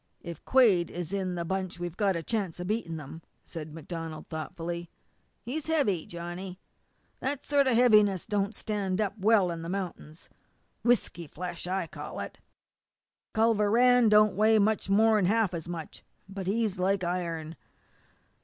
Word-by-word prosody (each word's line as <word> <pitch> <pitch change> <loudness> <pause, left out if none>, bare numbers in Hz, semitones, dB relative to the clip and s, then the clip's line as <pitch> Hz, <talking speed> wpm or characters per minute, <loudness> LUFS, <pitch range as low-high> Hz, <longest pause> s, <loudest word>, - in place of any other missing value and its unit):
"If 170 -3 -8
Quade 210 -10 +4
is 175 +1 -5
in 185 -2 -1
the 170 -1 -3
bunch 185 0 -3
we've 175 -1 -4
got 195 -2 +1
a 165 - -3
chance 195 -4 -2
of 175 - -4
beating 185 -5 -2
them," 155 +2 -9 0.2
said 155 -2 -7
MacDonald 165 0 -7
thoughtfully. 170 +2 -5 0.5
"He's 290 +6 -4
heavy, 230 - +1
Johnny 175 +2 -7 0.6
that 275 +1 -3
sort 285 -2 +3
of 255 - +3
heaviness 210 -6 +5
that - - -22
don't 205 +1 0
stand 200 -3 -2
up 205 -2 0
well 200 -3 +4
in 165 -1 -5
the 165 - -6
mount'ins; 180 -4 -6 0.5
whisky 230 -8 +1
flesh, 175 +3 -6
I 185 -1 -1
call - - -8
it. - - -6 1.0
Culver 220 -2 +3
Rann 245 +1 +5
don't 210 0 +5
weigh 220 +2 +4
much 215 -1 +1
more'n 215 0 +4
half 210 -1 +2
as 170 -1 -5
much, 170 -2 -7 0.2
but 195 -1 -6
he's 210 -1 0
like 190 +1 +1
iron. 170 -2 -3
190 Hz, 160 wpm, -29 LUFS, 170-215 Hz, 1.0 s, heaviness